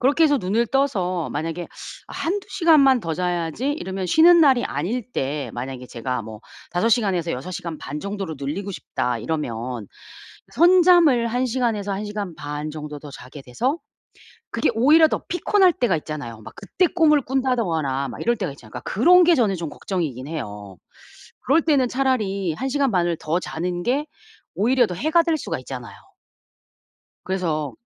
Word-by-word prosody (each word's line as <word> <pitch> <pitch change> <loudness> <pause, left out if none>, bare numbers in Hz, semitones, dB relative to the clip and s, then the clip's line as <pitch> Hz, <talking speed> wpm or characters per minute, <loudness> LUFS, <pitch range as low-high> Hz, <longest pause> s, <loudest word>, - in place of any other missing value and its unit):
그렇게 285 +6 +4
해서 290 -2 +4
눈을 220 +4 0
떠서 190 - 0
만약에 165 +2 -4 0.4
'아 - - -10
1~2시간만 330 -8 +3
더 165 -5 -3
자야지.' 180 - -2
이러면 190 -10 -4
쉬는 335 - +6
날이 265 -6 +5
아닐 210 - -3
때 140 +2 -3
만약에 125 +1 -6
제가 125 +1 -4
뭐 110 -1 -10 0.3
'5 200 +6 +1
시간에서 195 -8 +1
6 130 +8 -5
시간 170 -3 -5
반 145 +3 -6
정도로 195 -4 -4
늘리고 180 +9 -4
싶다.' 125 -8 -3
이러면 120 -5 -4 0.7
선잠을 340 -6 +5
1 250 +2 0
시간에서 225 -5 -1
1 195 +2 -3
시간 205 -4 -5
반 150 +1 -5
정도 150 -1 -7
더 145 -1 -10
자게 135 +2 -11
돼서 245 - -2 0.7
그게 - - +1
오히려 305 +8 +6
더 - - -2
피곤할 365 +1 +3
때가 190 -9 +1
있잖아요. 145 -8 -7
막 - - -11
그때 340 - 0
꿈을 310 -5 +3
꾼다거나 180 - -1
막 - - -8
이럴 235 0 +1
때가 185 -8 -3
있잖아요. 115 -6 -16
그러니까 125 - -7
그런 355 - +6
게 340 -1 +5
저는 215 -7 +2
좀 170 -3 -5
걱정이긴 145 - -4
해요. 105 - -7 0.6
그럴 305 +6 +3
때는 275 -6 +2
차라리 210 -10 0
1 265 +12 -3
시간 275 -1 +1
반을 175 -3 +1
더 160 +3 -1
자는 175 +1 -4
게 275 +5 0 0.5
오히려 240 +3 +3
더 180 - -5
해가 315 - +2
될 330 -2 +1
수가 - - -4
있잖아요. 125 -5 -8 1.3
그래서 160 -6 -2
190 Hz, 325 characters per minute, -22 LUFS, -, 1.3 s, 쉬는